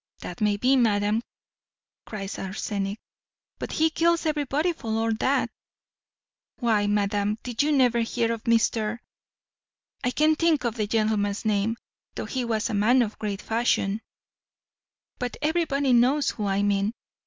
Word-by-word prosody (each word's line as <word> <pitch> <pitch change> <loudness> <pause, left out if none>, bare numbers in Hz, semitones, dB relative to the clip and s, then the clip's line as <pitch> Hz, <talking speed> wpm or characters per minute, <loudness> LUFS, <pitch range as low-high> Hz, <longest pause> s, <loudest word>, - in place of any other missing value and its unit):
"That 180 - -8
may 210 -1 +2
be, 255 +5 +3
madam," 215 -3 +2 0.9
cries 195 -2 -5
Arsenic; 195 +1 -3 0.6
"but - - -5
he 320 0 +2
kills 335 +1 +2
everybody 300 +2 0
for 275 - -11
all 225 +1 +1
that 275 +2 +1 1.1
why, 220 -5 +1
madam, 205 0 0
did 245 0 -1
you 300 +2 +2
never 250 -4 +3
hear 230 0 0
of 230 -1 -7
Mr.? 230 -1 +1 1.1
I 250 - +2
can't 310 +4 +2
think 330 -5 +2
of 235 -2 0
the 215 -3 -2
gentleman's 215 -2 0
name, 215 +2 +1 0.4
though - - -4
he 260 -2 -3
was 225 -2 -1
a 235 - -4
man 235 +5 +4
of 215 -2 -6
great 205 -2 -4
fashion; 225 -2 0 1.2
but 250 0 -4
everybody 295 -4 +1
knows 260 +5 +3
whom 210 -2 -3
I 195 +1 +1
mean." 205 +2 +1
225 Hz, 145 wpm, -25 LUFS, 205-260 Hz, 1.2 s, man